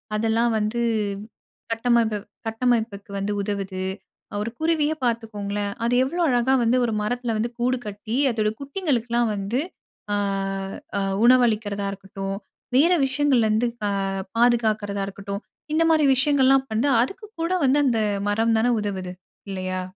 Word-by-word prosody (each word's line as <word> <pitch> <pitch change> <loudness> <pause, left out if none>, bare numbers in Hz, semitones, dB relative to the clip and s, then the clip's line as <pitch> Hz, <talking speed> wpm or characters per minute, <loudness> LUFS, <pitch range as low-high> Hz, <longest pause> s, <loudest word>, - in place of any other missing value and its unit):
அதெல்லாம் 225 +2 +2
வந்து 215 +3 -1 0.9
கட்டமப்பு 230 -1 +2 0.3
கட்டமைப்புக்கு 225 -3 -1
வந்து 200 +1 -2
உதவுது. 195 -2 -3 0.6
ஒரு 225 +2 -3
குருவியே 315 -1 +1
பாத்துக்கோங்களேன், 205 -3 -2
அது 235 +1 +1
எவ்வளோ 340 +7 -2
அழகா 245 +1 +2
வந்து 235 +2 +3
ஒரு 230 - -1
மரத்தில 240 +1 -1
வந்து 230 +2 -1
கூடு 250 +2 +1
கட்டி 210 +3 -4 0.2
அதோட 215 -1 +1
குட்டிங்களுக்குலாம் 245 - 0
வந்து 205 +6 -1 0.5
ஆ, - - +2 0.8
ஆ - - +1 0.2
உணவு 250 +1 +7
அளிக்கிறதா 210 -3 -1
இருக்கட்டும், 195 0 -5 0.4
வேற 310 +7 +5
விஷயங்கள்லருந்து 245 -5 +2 0.2
அ - - 0 0.5
பாதுகாக்குறதா 220 -4 +2
இருக்கட்டும், 200 +1 -6 0.3
இந்தமாரி 320 -1 +4
விஷயங்கள்லாம் 270 -1 +4
வந்து, 230 +6 +1
அதுக்குக்கூட 370 - -3
வந்து 270 +2 +4
அந்த 235 -4 +2 0.3
மரம் 225 +2 +2
தான 245 +2 +3
உதவுது, 190 -3 -3 0.4
இல்லையா? 185 -1 -3
230 Hz, 125 wpm, -24 LUFS, 205-255 Hz, 0.9 s, உணவு